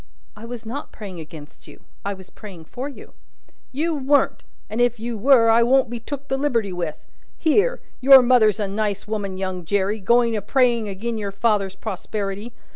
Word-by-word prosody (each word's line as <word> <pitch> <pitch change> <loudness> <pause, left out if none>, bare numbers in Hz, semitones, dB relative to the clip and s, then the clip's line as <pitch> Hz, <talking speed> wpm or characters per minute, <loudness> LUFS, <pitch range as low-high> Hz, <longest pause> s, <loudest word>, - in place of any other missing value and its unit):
"I 215 - -10
was 235 -1 -8
not 270 +7 -6
praying 195 -5 -9
against 155 -1 -12
you; - - -14 0.2
I 200 0 -3
was 190 -1 -15
praying 185 -7 -11
for 260 - -6
you." 280 - -13 0.6
"You 320 +5 -1
weren't. 285 0 +1 0.3
And 220 +3 -2
if 240 -1 +2
you 235 +1 -4
were, 230 0 +5
I 230 +1 +5
won't 250 0 +3
be 240 - -4
took 280 +4 -7
the 270 - -1
liberty 230 -9 0
with. 170 -4 -3 0.4
Here! 415 +10 +2 0.2
your 265 0 +8
mother's 235 -4 +4
a 205 - -1
nice 205 0 -2
woman, 205 -3 -3
young 185 -1 -4
Jerry, 200 +4 0
going 235 +3 +3
a 210 - -1
praying 235 -1 +2
agin 220 +4 -4
your 205 -1 -3
father's 200 -2 0
prosperity. 205 +1 -5
220 Hz, 185 wpm, -22 LUFS, 200-250 Hz, 0.6 s, your